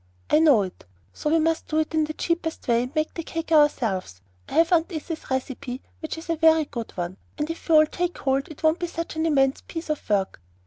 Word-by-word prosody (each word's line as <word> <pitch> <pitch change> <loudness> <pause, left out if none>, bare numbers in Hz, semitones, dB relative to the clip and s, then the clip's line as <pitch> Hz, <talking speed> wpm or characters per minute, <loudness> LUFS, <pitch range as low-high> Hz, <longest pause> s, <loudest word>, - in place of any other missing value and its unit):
"I 305 - +6
know 290 -10 +5
it; 185 - -8 0.3
so 300 - -2
we 325 - +4
must 325 0 +1
do 310 - -1
it 315 0 0
in 315 -1 +2
the 310 - -5
cheapest 330 -1 -2
way, 235 -1 +3
and 250 +5 -6
make 310 0 0
the 335 - -4
cake 330 0 -5
ourselves. 225 - +2 0.3
I - - -8
have 330 +1 +4
Aunt 330 +1 +2
Izzy's 315 0 -6
recipe, 260 -1 -3 0.2
which 315 - -5
is 325 - -9
a 335 - +1
very 320 -1 +5
good 235 -5 -6
one; 175 +1 -3 0.2
and 295 - -1
if 330 - -10
we 325 - +6
all 310 0 +8
take 350 +3 -3
hold, 270 0 0
it 310 - -12
won't 315 +2 +3
be 350 - -2
such 335 -1 -5
an 320 +1 0
immense 270 -3 +2
piece 330 -2 -4
of 305 - -5
work. 195 - 0
310 Hz, 240 wpm, -25 LUFS, 265-325 Hz, 0.3 s, all